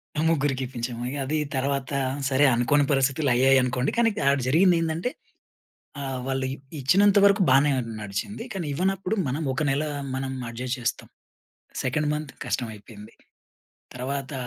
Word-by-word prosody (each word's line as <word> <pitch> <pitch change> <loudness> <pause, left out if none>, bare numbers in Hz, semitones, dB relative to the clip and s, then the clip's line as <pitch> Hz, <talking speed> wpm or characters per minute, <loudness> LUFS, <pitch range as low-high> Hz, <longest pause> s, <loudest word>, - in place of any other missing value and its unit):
మనం 155 +1 0
ముగ్గురికి 135 -4 0
ఇప్పించాం. 120 -1 -5
ఇగ 140 - -5
అది 155 +4 -1 0.2
తర్వాత 135 0 -1 0.4
సరే 135 +2 +4
అనుకోని 125 +5 +3
పరిస్థితుల్లో 135 0 +2
అయ్యాయి 135 +2 +5
అనుకోండి. 125 +1 0
కానీ 235 -1 +4 0.2
ఆడ 140 - +3
జరిగింది 175 +4 +5
ఏందంటే 165 +7 -1 0.9
ఆహ్, 135 -2 -3
వాళ్ళు 135 0 -1
ఇ - - -9 0.2
ఇచ్చినంత 200 +9 +4
వరకు 200 0 +5
బానే 140 +3 +5 0.3
నడిచింది. 105 - -5
కానీ 185 -5 -4
ఇవ్వనప్పుడు 190 +4 0
మనం 140 +5 -2
ఒక 135 - -1
నెల 140 +3 0 0.3
మనం 130 0 -3 0.2
అడ్జస్ట్ 125 +2 -4
చేస్తాం. 120 - -3 0.8
సెకండ్ 150 +4 0
మంత్ 150 -2 -5
కష్టమైపోయింది. 110 -2 -6 0.8
తర్వాత 135 +2 -4
135 Hz, 140 wpm, -25 LUFS, 130-155 Hz, 0.9 s, అయ్యాయి